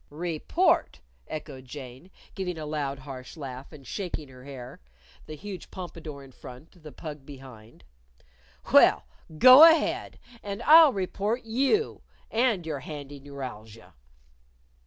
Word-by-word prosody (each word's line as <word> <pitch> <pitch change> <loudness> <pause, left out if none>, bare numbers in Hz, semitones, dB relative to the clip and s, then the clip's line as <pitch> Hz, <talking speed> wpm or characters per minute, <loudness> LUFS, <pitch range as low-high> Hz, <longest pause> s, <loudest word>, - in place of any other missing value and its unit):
"Report!" 155 - 0 0.3
echoed 145 -4 -8
Jane, 130 +4 -10 0.2
giving 180 -3 -4
a 155 - -6
loud, 145 -2 -3
harsh 130 +1 -10
laugh, 135 -3 -8
and 145 -4 -13
shaking 160 -3 -5
her 130 0 -14
hair 130 -3 -10 0.5
the 155 - -7
huge 190 +3 -9
pompadour 160 -6 -8
in 135 - -15
front, 130 +8 -14
the 150 -1 -11
pug 150 +2 -9
behind. 130 - -13 0.9
"Well, - - +6 0.3
go 255 - +10
ahead. 325 -1 +4 0.2
And 200 -1 -6
I'll 315 -1 +8
report 205 +3 -2
you 275 - 0 0.3
and 225 -6 +1
your 155 -3 -4
handy 145 0 -8
neuralgia." 125 -6 -10
150 Hz, 125 wpm, -27 LUFS, 135-190 Hz, 0.9 s, go